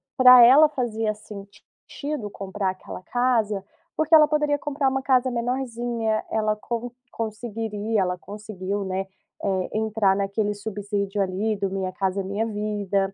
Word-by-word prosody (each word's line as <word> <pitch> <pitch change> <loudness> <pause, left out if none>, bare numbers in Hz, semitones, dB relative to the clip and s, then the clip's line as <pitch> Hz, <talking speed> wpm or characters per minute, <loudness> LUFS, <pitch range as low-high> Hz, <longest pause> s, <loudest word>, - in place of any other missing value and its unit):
pra 250 -1 +9
ela 285 +6 +8
fazia 225 -6 -1
sentido 210 +5 -8
comprar 195 -1 -3
aquela 185 0 -9
casa, 225 -5 0 0.3
porque 315 +1 0
ela 305 -1 +9
poderia 300 -1 +1
comprar 285 -2 -1
uma 265 0 -1
casa 260 -1 +2
menorzinha, 235 -2 -2
ela 215 -1 0
con 235 +2 -4 0.2
conseguiria 220 -1 -3
ela 180 -1 -1
conseguiu, 205 -1 -5
né, 190 +1 -3 0.4
eh, 190 -2 -1
entrar 215 -3 +2
naquele 200 +1 -1
subsídio 205 -1 -3
ali 200 +4 -1
do 195 -1 -1
Minha 190 -1 -3
Casa 195 +1 -1
Minha 200 +4 -2
Vida. 205 -2 -1
215 Hz, 135 wpm, -24 LUFS, 200-240 Hz, 0.4 s, pra